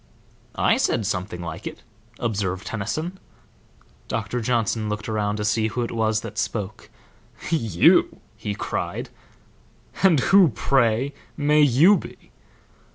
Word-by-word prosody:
"I - - +3
said 110 - 0
something 90 -2 -3
like 85 +3 -6
it," - - -8 0.3
observed 100 -4 -2
Tennyson. 155 - -4 0.9
Doctor 115 +2 -3
Johnson 115 -2 0
looked 105 0 -4
around 105 -2 -1
to 105 0 -3
see 110 +1 +1
who 120 +2 -2
it 115 - -4
was 110 -1 0
that 105 -2 -6
spoke. 105 -1 -4 0.6
"You?" 115 - +3 0.2
he 100 - -4
cried. - - -4 0.9
"And 180 -7 +5
who, 195 -4 +8
pray, 130 +1 +1 0.2
may 150 +1 +3
you 150 - +6
be?" - - -11
110 Hz, 125 wpm, -23 LUFS, 105-135 Hz, 0.9 s, who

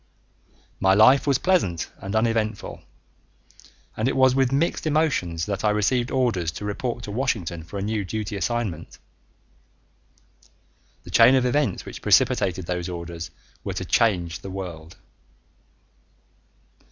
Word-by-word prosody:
My 95 0 +4
life 130 +8 +6
was 140 -3 +3
pleasant 130 - 0
and 100 +2 -5
uneventful, 110 -2 -1 1.1
and 110 - -1
it 135 - 0
was 130 -1 +5
with 135 -1 +2
mixed 155 +3 0
emotions 135 - 0
that 100 -1 -3
I 105 - +3
received 120 +4 +1
orders 115 -11 0
to 105 - -6
report 120 +3 -3
to 105 - -6
Washington 100 -9 -2
for 85 +5 -8
a 100 - -3
new 105 0 -1
duty 105 +2 -4
assignment. 100 -4 -3 2.1
The - - -11
chain 120 +3 +7
of 130 -1 +2
events 125 -5 0
which - - -9
precipitated 100 -5 +2
those 90 +1 -3
orders 85 -1 -6 0.3
were - - -4
to - - -3
change 90 -7 +1
the 95 - -8
world.... 90 -4 -7
105 Hz, 135 wpm, -24 LUFS, 90-125 Hz, 2.1 s, chain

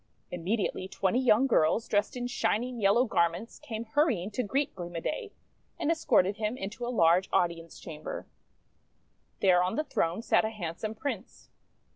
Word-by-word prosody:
Immediately 185 +2 -2
twenty 195 +4 0
young 255 -1 +4
girls, 225 -2 +2
dressed 205 +4 0
in 245 - -3
shining 245 0 -1
yellow 205 +6 +4
garments, 170 +1 0
came 230 -6 -6
hurrying 225 - +1
to 250 - -1
greet 270 +6 -1
Gleam 175 -2 -7
o' - - -1
Day, 415 - -4 0.5
and 305 - +1
escorted 225 - +2
him 220 +2 -2
into 215 +5 -6
a 240 - -2
large 180 -4 +3
audience 170 -1 0
chamber. - - -7 1.2
There 180 -2 +5
on 180 +4 0
the 305 - 0
throne 175 - -1
sat - - +3
a 220 - 0
handsome 215 +1 -5
Prince. 280 +6 -6
220 Hz, 160 wpm, -29 LUFS, 180-250 Hz, 1.2 s, There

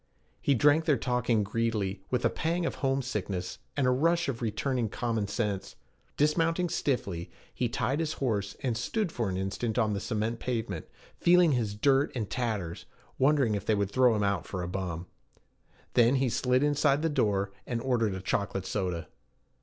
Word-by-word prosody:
He 140 - +3
drank 145 +6 +4
their 150 -4 +3
talk 125 0 -1
in 110 -3 +4
greedily, 105 -3 -1
with 125 - 0
a - - +5
pang 170 +2 -1
of - - -1
homesickness 125 -9 -2 0.2
and 140 - +2
a 125 - +4
rush 165 +6 +2
of 125 -4 -3
returning 120 +1 -1
common 115 -1 -1
sense. 105 -2 -2 0.4
Dismounting 165 +4 +2
stiffly, 100 - -1 0.2
he 120 - -1
tied 135 +5 -1
his 155 -1 -1
horse, 100 -6 -1
and 125 -4 0
stood 175 - -1
for 115 -8 -1
an 95 - -2
instant 100 +5 -2
on 110 -3 +2
the 100 - -1
cement 110 +2 -2
pavement, 110 -9 -3 0.3
feeling 175 -1 +5
his 115 -6 0
dirt 135 +5 +3
and 110 -5 -2
tatters, 105 -9 -2 0.3
wondering 135 -4 +3
if 100 -2 -2
they 110 - +4
would 100 -1 -1
throw 125 -2 +4
him 105 - 0
out 100 -3 0
for 90 -1 -4
a - - -3
bum. 90 -2 -4 0.9
Then 120 +2 +5
he 130 -1 +2
slid 125 +2 +2
inside 145 0 +2
the - - +3
door, 100 -9 +1 0.2
and 120 -2 -1
ordered 115 -5 +1
a 95 - -5
chocolate 100 0 -1
soda. 90 -5 -2
115 Hz, 180 wpm, -29 LUFS, 100-135 Hz, 0.9 s, a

